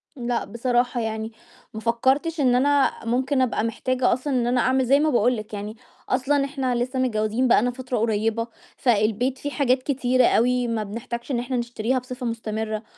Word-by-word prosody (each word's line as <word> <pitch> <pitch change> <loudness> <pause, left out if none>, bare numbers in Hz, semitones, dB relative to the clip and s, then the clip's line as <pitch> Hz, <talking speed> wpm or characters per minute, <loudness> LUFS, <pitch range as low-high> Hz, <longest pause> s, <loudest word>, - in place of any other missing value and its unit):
لأ، 240 -2 -2
بصراحة 245 +3 0
يعني، 220 0 -3 0.4
ما 220 - -5
فكّرتش 265 +8 +1
إن 255 -3 +3
أنا 280 +2 +3
ممكن 260 +3 +1
أبقى 240 -3 0
محتاجة 250 +2 0
أصلًا 265 +3 -2
إن 245 -2 +1
أنا 245 0 +2
أعمل 260 0 +2
زي 275 +3 +4
ما 310 - +2
باقول 245 -2 +2
لِك 215 0 -8
يعني 210 +1 -5 0.3
أصلًا 275 +2 +1
إحنا 270 -3 -2
لسه 250 +2 -1
متجوّزين 225 0 +1
بقى 235 - +5
لنا 245 +2 0
فترة 255 0 -4
قريّبة، 225 +1 0 0.3
فالبيت 235 +2 +1
في 290 - -5
حاجات 255 -3 +1
كتيرة 255 -2 +2
أوي 245 +1 +2
ما 225 -2 -1
بنحتاجش 235 +5 -6
إن 240 - 0
إحنا 250 +1 -2
نشتريها 240 +1 -1
بصفة 250 0 -7
مستمرة، 220 -1 -3
245 Hz, 180 wpm, -24 LUFS, 230-260 Hz, 0.4 s, بقى